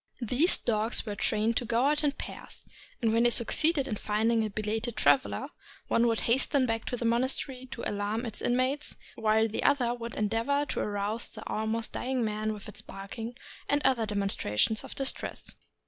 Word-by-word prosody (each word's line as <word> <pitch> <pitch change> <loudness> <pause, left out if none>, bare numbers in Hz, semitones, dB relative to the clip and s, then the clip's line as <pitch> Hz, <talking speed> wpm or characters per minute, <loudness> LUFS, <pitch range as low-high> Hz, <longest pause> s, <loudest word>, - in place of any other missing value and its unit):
These 255 - +4
dogs 220 0 0
were 210 - -3
trained 215 +2 0
to 245 - 0
go 235 +2 +1
out 300 +2 +2
in 290 -2 +2
pairs, - - -9 0.4
and 220 -1 +3
when 230 - +3
they 240 - +5
succeeded 275 +5 +4
in 215 - -3
finding 220 +2 +1
a 215 - -2
belated 215 +3 -3
traveler, 265 - +2 0.4
one 235 +1 +3
would 230 -1 +1
hasten 260 +2 +2
back 225 -2 -2
to 245 - -3
the 235 - -3
monastery 255 +2 0
to 235 -1 -4
alarm 205 +3 -2
its 220 -3 -5
inmates, 255 +4 0 0.2
while 220 0 +2
the 220 - -3
other 255 -4 +2
would 235 -1 -6
endeavor 230 +7 0
to - - -1
arouse 205 +2 -1
the 220 - -9
almost 220 +1 -1
dying 255 -2 -1
man 215 0 -1
with 210 0 -8
its 210 0 -7
barking 215 +4 -7 0.3
and 285 - +3
other 245 -4 +3
demonstrations 200 - 0
of - - -9
distress. 270 -1 -2
230 Hz, 180 wpm, -29 LUFS, 215-255 Hz, 0.4 s, they